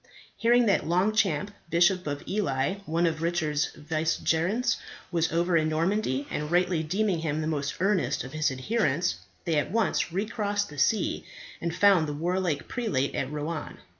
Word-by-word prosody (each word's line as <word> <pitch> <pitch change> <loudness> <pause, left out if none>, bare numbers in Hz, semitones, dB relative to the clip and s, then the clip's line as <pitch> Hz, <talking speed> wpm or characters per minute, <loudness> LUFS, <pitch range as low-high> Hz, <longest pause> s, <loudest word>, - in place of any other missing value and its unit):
Hearing 240 +1 +4
that 200 -6 +2
Longchamp, 190 -1 +2 0.2
Bishop 175 +1 +3
of 145 -1 -4
Ely, 140 -4 0
one 165 +2 +1
of 160 -2 -1
Richard's 160 -3 0
vicegerents, 165 +8 0 0.3
was 165 -2 +1
over 170 +2 +1
in 155 -1 +3
Normandy, 155 -4 0
and 150 0 -3
rightly 175 -1 +2
deeming 185 +3 0
him 155 -1 -1
the 155 - -2
most 145 -3 -2
earnest 190 0 +1
of 125 - -9
his 155 0 +1
adherents, 160 - 0 0.3
they 165 -3 +1
at - - -2
once 220 -5 +1
recrossed 205 +1 -1
the 145 -1 -8
sea, 205 +11 +1 0.4
and 170 -1 -2
found 185 -4 +5
the 150 - -3
warlike 170 -1 -1
prelate 145 - -1
at 135 +1 -2
Rouen. 150 +1 -4
170 Hz, 160 wpm, -27 LUFS, 150-195 Hz, 0.4 s, found